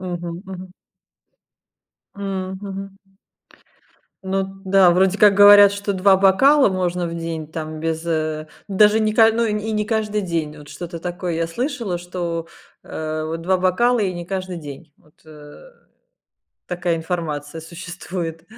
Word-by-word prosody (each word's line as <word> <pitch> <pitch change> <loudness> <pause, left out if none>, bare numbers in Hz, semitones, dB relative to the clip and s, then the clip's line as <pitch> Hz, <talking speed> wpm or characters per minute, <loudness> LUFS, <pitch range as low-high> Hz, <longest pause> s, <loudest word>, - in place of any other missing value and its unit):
Мгм 175 -1 -5
мгм. 185 -1 -9 1.4
М, 190 -1 -4
мгм. 195 0 -7 1.3
Ну 190 0 -1 0.2
да, 190 -2 +5
вроде 190 +2 +3
как 205 -2 +6
говорят, 205 0 +8
что 200 0 -3
2 190 0 +4
бокала 265 +9 +5
можно 180 -2 -1
в 165 - -5
день, 165 -2 -5
там, 155 0 -6
без, 160 +1 -3
э, 155 -2 -2 0.2
даже 210 +2 +4
не 215 -1 +1
ка 225 0 +6
ну, 230 +1 +1
и 215 - 0
не 210 0 -2
каждый 215 -2 -1
день. 160 -4 -3
Вот 145 0 -13
что-то 170 -1 -7
такое 175 0 -4
я 165 0 -1
слышала, 235 - -3
что, 170 -2 -4 0.3
э, 155 0 -4
вот 165 +1 -4
2 185 +2 +2
бокала 235 +7 +2
и 190 -3 0
не 175 -1 -6
каждый 185 -2 -4
день. 150 0 -10
Вот, 150 - -28
э, 150 - -14 1.0
такая 175 -1 -1
информация 160 -2 -4
существует. 170 -1 -7
180 Hz, 145 wpm, -21 LUFS, 165-200 Hz, 1.4 s, говорят